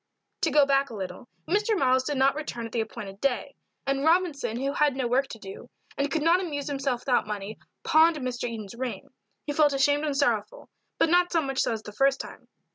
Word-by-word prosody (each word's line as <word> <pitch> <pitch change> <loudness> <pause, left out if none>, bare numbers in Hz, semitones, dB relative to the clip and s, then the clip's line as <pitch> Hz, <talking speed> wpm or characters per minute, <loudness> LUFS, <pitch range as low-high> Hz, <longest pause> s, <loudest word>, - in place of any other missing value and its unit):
To - - +2
go 295 -2 +5
back 275 0 +2
a 230 - -8
little. 190 +4 -7 0.2
Mr. 420 +3 +1
Miles 260 -4 +3
did 290 0 -2
not 270 +1 +4
return 275 -6 -5
at 225 - -8
the 230 - 0
appointed 210 -3 -7
day; 275 -3 -1 0.3
and 275 0 0
Robinson, 315 -8 +1
who 275 +2 -1
had 295 -3 +2
no 260 -2 -1
work 260 +3 +1
to 230 - -9
do, 195 +3 -10 0.3
and 280 +1 0
could 295 +2 -1
not 335 +3 +4
amuse 290 -6 -4
himself 270 -4 -1
without 250 -5 +1
money, 210 0 -5 0.2
pawned 325 +1 +5
Mr. 250 -4 -3
Eden's 215 -4 -7
ring. 245 0 -5 0.4
He 290 - -2
felt 295 -1 +4
ashamed 285 +2 +2
and 285 -2 -1
sorrowful, 230 -7 -1 0.3
but - - +3
not 355 0 +4
so 335 - +3
much 270 -1 -3
so - - +2
as 220 -1 -4
the 210 - -8
first 270 +4 +2
time. - - -9
275 Hz, 220 wpm, -27 LUFS, 235-295 Hz, 0.4 s, go